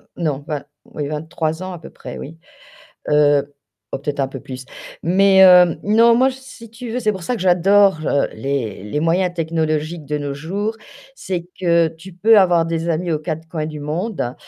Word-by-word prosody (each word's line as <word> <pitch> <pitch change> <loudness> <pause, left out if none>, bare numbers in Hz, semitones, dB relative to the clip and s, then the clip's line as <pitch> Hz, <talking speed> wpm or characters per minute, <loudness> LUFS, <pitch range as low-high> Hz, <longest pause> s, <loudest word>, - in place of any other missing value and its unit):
non, 150 -5 -2
vin 150 -3 -3 0.2
oui, 150 - -5
23 160 +2 -3
ans 185 0 -5
à 175 - -8
peu - - -12
près, - - -9
oui, 160 +3 -9 0.7
heu, 145 -1 +3 0.4
oh - - -2
peut-être 145 0 -3
un 135 - 0
peu 135 -1 -8
plus, 130 0 -8 0.4
mais 190 +3 +5
heu, 180 -2 +7
non, 230 +3 +5
moi, 255 +3 +4
si 260 -3 -12
tu 230 +1 -8
veux, 240 - -2
c'est 215 -3 +1
pour 190 -3 -8
ça 250 - -2
que 235 - -6
j'adore, 190 0 +4
heu, 140 - +1
les 130 -9 -3
les 105 +8 -3
moyens 175 +3 +1
technologiques 160 -1 -2
de 150 +1 -3
nos 145 -1 -4
jours, 200 +9 -3 0.4
c'est 180 -7 -5
que 170 -2 +3
tu 165 +4 -13
peux 210 +5 +5
avoir 175 -4 +4
des 165 0 -2
amis 170 +2 -1
aux 155 - 0
quatre 160 +1 -5
coins 160 -2 -3
du 155 -1 -7
monde, 155 - -3
165 Hz, 195 wpm, -19 LUFS, 150-190 Hz, 0.7 s, heu